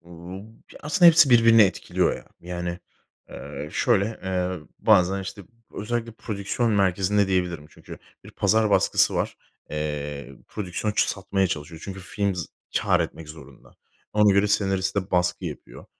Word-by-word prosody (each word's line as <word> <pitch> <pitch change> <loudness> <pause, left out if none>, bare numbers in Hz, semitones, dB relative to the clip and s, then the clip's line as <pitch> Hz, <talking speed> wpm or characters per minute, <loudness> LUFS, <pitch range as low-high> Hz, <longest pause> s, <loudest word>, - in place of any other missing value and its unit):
Uuu, 85 +3 -10 0.4
aslında 175 +5 +4
hepsi 160 -4 +7
birbirini 115 -2 +7
etkiliyor 95 -4 0
ya. - - -13 0.2
Yani, 90 0 -5 0.5
eee, 70 +3 -8
şöyle, 100 - +2 0.2
eee, 90 -1 -2 0.2
bazen, 95 -2 +3
işte, 100 +2 -8 0.3
özellikle 115 +1 -3
prodüksiyon 110 +2 -2
merkezinde 100 +1 +2
diyebilirim 90 -5 -1
çünkü - - -12 0.3
bir - - -12
pazar 110 -1 +1
baskısı - - +3
var. - - -2 0.3
Eee, 75 -2 -5
prodüksiyon 105 +1 -3
ç - - +1
satmaya 95 0 0
çalışıyor. 80 -1 -6
Çünkü 95 -1 -7
film 100 +1 -2
z 85 -3 -4 0.3
kâr - - +2
etmek 80 -2 -5
zorunda. 80 +1 -14 0.4
Ona 105 -1 +4
göre 100 +1 +3
senariste 95 -1 0
baskı 90 0 0
yapıyor, - - -8
95 Hz, 140 wpm, -24 LUFS, 85-105 Hz, 0.5 s, hepsi